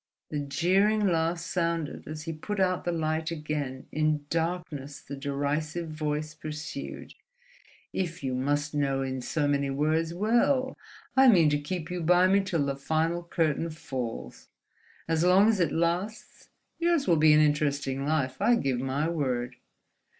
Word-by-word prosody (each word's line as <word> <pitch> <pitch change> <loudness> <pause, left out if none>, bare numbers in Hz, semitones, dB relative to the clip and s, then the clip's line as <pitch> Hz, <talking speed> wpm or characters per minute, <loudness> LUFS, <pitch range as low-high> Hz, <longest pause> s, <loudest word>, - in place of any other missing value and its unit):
The 150 - -1
jeering 190 +9 +2
laugh 165 -1 +1
sounded 170 -2 -2
as 155 +1 -6
he 165 0 -4
put 200 +6 -5
out 185 -1 +1
the 175 - +1
light 160 -1 -1
again, 150 -5 -4
in 155 -1 0
darkness 165 -4 -3
the 140 - -8
derisive 145 +4 -2
voice 155 0 -3
pursued: 155 0 -7 0.8
"If 170 -5 -3
you 130 -1 -1
must 145 +3 -1
know 135 -2 0
in 130 -1 -3
so 145 +4 -1
many 140 -1 +1
words—well, 175 - +1 0.4
I 265 0 +7
mean 170 -10 +6
to 145 - +1
keep 170 +2 -4
you 180 -1 -3
by 180 +2 +5
me 195 +2 +4
till 175 -7 -1
the 140 0 -1
final 160 +4 0
curtain 165 -2 0
falls. 125 - -6 0.6
As 165 0 +1
long 185 +4 +6
as 220 -3 +3
it 170 - +2
lasts, 175 +7 -2 0.3
yours 340 -4 +2
will 170 -3 +4
be 155 0 +6
an 150 - +6
interesting 145 -3 +1
life—I 150 - +2
give 135 - 0
my 135 +4 -1
word." 130 -7 -2
155 Hz, 150 wpm, -28 LUFS, 145-175 Hz, 0.8 s, I